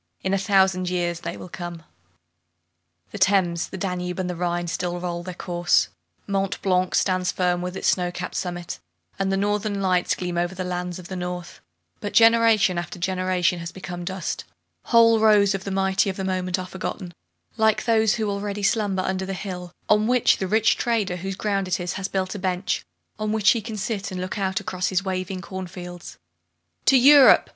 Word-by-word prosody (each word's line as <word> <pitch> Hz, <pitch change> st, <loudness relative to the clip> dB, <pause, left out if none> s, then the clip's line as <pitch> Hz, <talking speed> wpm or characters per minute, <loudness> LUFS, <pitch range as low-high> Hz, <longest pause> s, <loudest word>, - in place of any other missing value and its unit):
In 190 Hz, -, 0 dB
a -, -, +3 dB
thousand 190 Hz, -2 st, +2 dB
years 175 Hz, -1 st, -1 dB
they 170 Hz, 0 st, -5 dB
will -, -, -9 dB
come! 175 Hz, -2 st, -7 dB, 1.3 s
The 205 Hz, -, -7 dB
Thames, 185 Hz, -3 st, +2 dB
the -, -, -7 dB
Danube, 180 Hz, -1 st, -3 dB
and 185 Hz, -1 st, -2 dB
the 180 Hz, -, -3 dB
Rhine 175 Hz, 0 st, -1 dB
still 175 Hz, +1 st, -3 dB
roll 175 Hz, -1 st, -3 dB
their 180 Hz, 0 st, -7 dB
course, 175 Hz, -, +1 dB, 0.4 s
Mont 195 Hz, -1 st, -1 dB
Blanc 185 Hz, -1 st, +1 dB
stands 185 Hz, -1 st, +1 dB
firm 180 Hz, -1 st, 0 dB
with 180 Hz, +1 st, -4 dB
its -, -, +1 dB
snow 180 Hz, -1 st, +1 dB
capped 180 Hz, 0 st, -5 dB
summit, 175 Hz, -1 st, -4 dB, 0.4 s
and 195 Hz, 0 st, 0 dB
the 195 Hz, -, +1 dB
Northern 205 Hz, 0 st, 0 dB
Lights 185 Hz, -2 st, +1 dB
gleam 175 Hz, -1 st, -3 dB
over 175 Hz, +2 st, -1 dB
the 185 Hz, -, -3 dB
land 180 Hz, -1 st, -3 dB
of 180 Hz, -2 st, -10 dB
the 190 Hz, -, -6 dB
North; 180 Hz, -1 st, -5 dB, 0.4 s
but 205 Hz, -, -5 dB
generation 225 Hz, -5 st, +5 dB
after 175 Hz, -, -6 dB
generation 185 Hz, 0 st, 0 dB
has 170 Hz, +1 st, -6 dB
become 180 Hz, -1 st, -7 dB
dust, 190 Hz, +2 st, -4 dB, 0.4 s
whole 230 Hz, -1 st, +5 dB
rows 210 Hz, -2 st, +5 dB
of 195 Hz, -1 st, -4 dB
the -, -, -3 dB
mighty 190 Hz, +1 st, +1 dB
of 190 Hz, -, -4 dB
the 190 Hz, -, -3 dB
moment 185 Hz, 0 st, -1 dB
are 185 Hz, -, -4 dB
forgotten, 185 Hz, -1 st, -6 dB, 0.4 s
like 220 Hz, -1 st, +2 dB
those 220 Hz, -2 st, +3 dB
who 220 Hz, -2 st, -1 dB
already 200 Hz, 0 st, -3 dB
slumber 200 Hz, -2 st, +1 dB
under 190 Hz, 0 st, -2 dB
the 195 Hz, -, -3 dB
hill 180 Hz, -2 st, -6 dB, 0.2 s
on 210 Hz, +1 st, +3 dB
which 250 Hz, -1 st, +4 dB
the 190 Hz, -, -2 dB
rich 220 Hz, +3 st, +3 dB
trader, 215 Hz, -7 st, 0 dB
whose 190 Hz, +2 st, -4 dB
ground 200 Hz, -1 st, -1 dB
it 185 Hz, 0 st, 0 dB
is, 175 Hz, 0 st, -3 dB
has 190 Hz, 0 st, -3 dB
built 190 Hz, -1 st, -2 dB
a 205 Hz, -, -6 dB
bench, 185 Hz, 0 st, -1 dB, 0.4 s
on 215 Hz, 0 st, -1 dB
which 215 Hz, -2 st, +4 dB
he 230 Hz, -, 0 dB
can 215 Hz, 0 st, -6 dB
sit 210 Hz, -1 st, -3 dB
and 185 Hz, -, -5 dB
look 185 Hz, +3 st, -4 dB
out 190 Hz, -1 st, 0 dB
across 185 Hz, 0 st, -2 dB
his 190 Hz, +1 st, 0 dB
waving 185 Hz, 0 st, -3 dB
corn 190 Hz, 0 st, -6 dB
fields. 175 Hz, -1 st, -9 dB, 0.7 s
"To 270 Hz, -, +7 dB
Europe!" 275 Hz, +2 st, +7 dB
185 Hz, 200 wpm, -24 LUFS, 180-200 Hz, 1.3 s, To